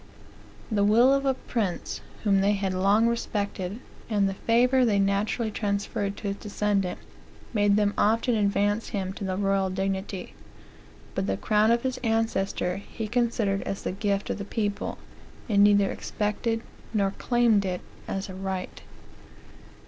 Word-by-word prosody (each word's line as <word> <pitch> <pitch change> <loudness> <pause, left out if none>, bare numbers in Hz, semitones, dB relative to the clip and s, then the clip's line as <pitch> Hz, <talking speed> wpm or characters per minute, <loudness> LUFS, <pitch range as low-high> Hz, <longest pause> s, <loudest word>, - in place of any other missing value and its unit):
The 205 -2 +2
will 235 +6 +5
of 275 0 +1
a 265 - +2
prince 215 -8 -3 0.2
whom 200 -3 +3
they 200 +1 +3
had 195 -2 -1
long 200 +4 +3
respected, 205 -3 -2 0.3
and 205 -3 +2
the 195 - -1
favor 245 +5 +3
they 215 -4 +3
naturally 200 +3 +1
transferred 200 -1 -2
to 205 - -3
his 200 - -3
descendant, 205 -3 -1 0.6
made 205 -2 +3
them 205 -1 +2
often 230 +4 +3
advance 205 0 +1
him 190 -2 -3
to 200 - -7
the 185 -1 -2
royal 195 -1 +1
dignity; 190 0 -3 0.8
but 95 - -1
the 95 0 0
crown 215 0 +3
of 235 0 +3
his 260 -1 -2
ancestor 220 -5 0
he 215 +2 -6
cnsidered 225 -4 +1
as 195 - -4
the - - -1
gift 200 +1 -1
of - - -3
the - - -3
people, 205 0 -2 0.5
and 200 -3 +4
neither 205 -1 +5
expected 225 +2 -2 0.3
nor 200 -2 +2
claimed 240 -4 +3
it 180 -2 -2 0.3
as 195 0 -3
a 190 - -8
right." 190 -1 -4
205 Hz, 155 wpm, -27 LUFS, 195-225 Hz, 0.8 s, will